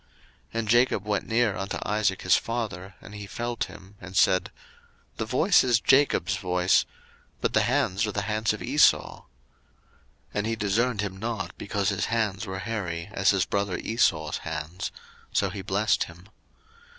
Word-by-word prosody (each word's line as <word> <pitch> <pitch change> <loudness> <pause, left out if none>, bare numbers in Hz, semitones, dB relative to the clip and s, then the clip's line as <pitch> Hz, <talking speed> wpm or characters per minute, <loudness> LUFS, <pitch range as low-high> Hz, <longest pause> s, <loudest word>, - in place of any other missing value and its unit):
01:027:022 65 - -35 0.5
And 110 - -3
Jacob 120 -3 +3
went 105 -2 -1
near 115 -3 +2
unto 95 0 -3
Isaac 105 -2 0
his 90 - +5
father; 105 -5 -3
and 105 - -12
he 105 -1 -7
felt 120 +3 -3
him, 95 +1 -13
and 90 +1 -6
said, 95 -2 +4 0.7
The 110 - -2
voice 160 - +4
is 120 -3 +3
Jacob's 110 -7 +3
voice, 90 -1 +2 0.5
but - - -1
the - - +4
hands 100 +4 +1
are - - -2
the 105 0 -2
hands 110 +1 0
of - - -5
Esau. - - +3
01:027:023 - - -22 1.1
And 105 +1 -1
he 115 - 0
discerned 110 +2 0
him 100 -2 -4
not, 100 -4 -4
because 100 -1 -1
his 100 - -1
hands 110 -3 -1
were 95 0 -4
hairy, 95 -4 -4
as 95 -1 +2
his 95 -2 +3
brother 100 -2 -1
Esau's 80 -9 0
hands: 80 +2 -5 0.4
so 100 -2 +1
he 100 0 -6
blessed 100 +3 +1
him. 85 +4 -15
100 Hz, 170 wpm, -26 LUFS, 95-110 Hz, 1.1 s, his